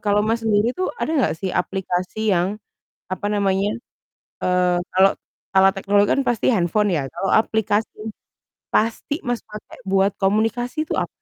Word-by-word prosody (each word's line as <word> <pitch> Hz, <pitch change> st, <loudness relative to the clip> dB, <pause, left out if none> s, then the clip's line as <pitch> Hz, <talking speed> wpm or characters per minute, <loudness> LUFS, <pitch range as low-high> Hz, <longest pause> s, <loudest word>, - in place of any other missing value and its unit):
kalau 205 Hz, 0 st, +2 dB
Mas 225 Hz, +1 st, 0 dB
sendiri 220 Hz, +1 st, +2 dB
tuh, 370 Hz, +7 st, -2 dB
ada 315 Hz, -, -2 dB
nggak 285 Hz, -, +2 dB
sih 185 Hz, +2 st, -4 dB
aplikasi 190 Hz, +3 st, -1 dB
yang, 185 Hz, +4 st, +1 dB, 0.5 s
apa 185 Hz, +2 st, -3 dB
namanya, 200 Hz, 0 st, +1 dB, 0.7 s
eee, 180 Hz, -1 st, +2 dB, 0.2 s
kalau 190 Hz, +1 st, +5 dB, 0.5 s
alat 190 Hz, 0 st, +6 dB
teknologi 200 Hz, +1 st, +2 dB
kan 275 Hz, -, +2 dB
pasti 240 Hz, -3 st, 0 dB
handphone 200 Hz, +2 st, +1 dB
ya, 135 Hz, -5 st, -1 dB
kalau 195 Hz, -, -3 dB
aplikasi 220 Hz, -1 st, +2 dB, 0.8 s
pasti 230 Hz, +6 st, 0 dB
Mas 245 Hz, -1 st, -1 dB
pakai 210 Hz, 0 st, -11 dB
buat 195 Hz, +1 st, +3 dB
komunikasi 225 Hz, +9 st, 0 dB
tuh -, -, -1 dB
apa? -, -, -2 dB
205 Hz, 150 wpm, -21 LUFS, 190-220 Hz, 0.8 s, alat